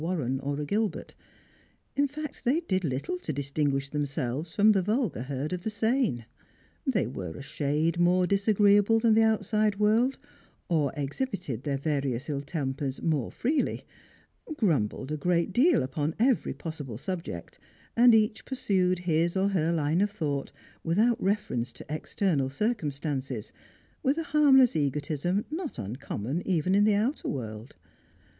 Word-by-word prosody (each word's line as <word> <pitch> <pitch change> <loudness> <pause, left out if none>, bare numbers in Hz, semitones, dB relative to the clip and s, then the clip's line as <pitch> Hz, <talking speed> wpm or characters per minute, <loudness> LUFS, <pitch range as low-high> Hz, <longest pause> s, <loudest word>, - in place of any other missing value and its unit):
Warren 150 -7 -1
or 140 +1 -3
a 150 - -2
Gilbert; 210 +6 -2 0.8
in 285 0 +3
fact, 295 +1 -7
they 280 +8 +2
did 190 - -1
little 145 +4 -2
to 180 -3 -4
distinguisli 140 -1 -1
them« 145 -1 -1
selves 145 +3 -3
from 215 +1 +6
the 195 -2 +3
vulgar 210 - 0
herd 140 +4 -3
of 180 - -3
the 220 - -2
sane. 220 - 0 0.6
They 235 - +2
were 95 -8 -6
a - - -8
shade 150 +5 -1
more 180 +1 +4
disagreeable 205 +2 +4
than 225 0 +4
the 225 - +5
outside 215 -1 +2
world, 225 +6 +3 0.5
or 155 -6 +1
exhibited 145 - -3
their 140 -1 -1
various 140 -2 -2
ill 140 -1 -2
tempers 140 -2 -3
more 150 -7 0
freely; 280 +4 -1 0.7
grumbled 135 - 0
a 155 - -1
great 175 +4 +1
deal 295 - +4
upon 145 +4 -2
every 245 +2 +2
possible 145 -9 -6
subject, 165 - -6 0.4
and 240 0 +7
each 220 0 +2
pursued 195 -9 +1
his 170 +2 +1
or 195 +1 +2
her 170 -4 +1
line 160 +1 +1
of 205 - +2
thought 150 -9 -3 0.3
without 215 +8 +2
reference 195 - -1
to - - -9
external 155 -2 0
circumstances, 140 - -2 0.5
with 275 +2 +1
a 330 - -1
harmless 275 - +5
egotism 150 +6 -1
not 320 -1 -4
uncommon 120 - -4
even 180 0 +1
in 205 +1 +5
the 215 -1 +4
outer 230 +8 -1
world. 110 -3 -5
170 Hz, 150 wpm, -28 LUFS, 140-215 Hz, 0.8 s, and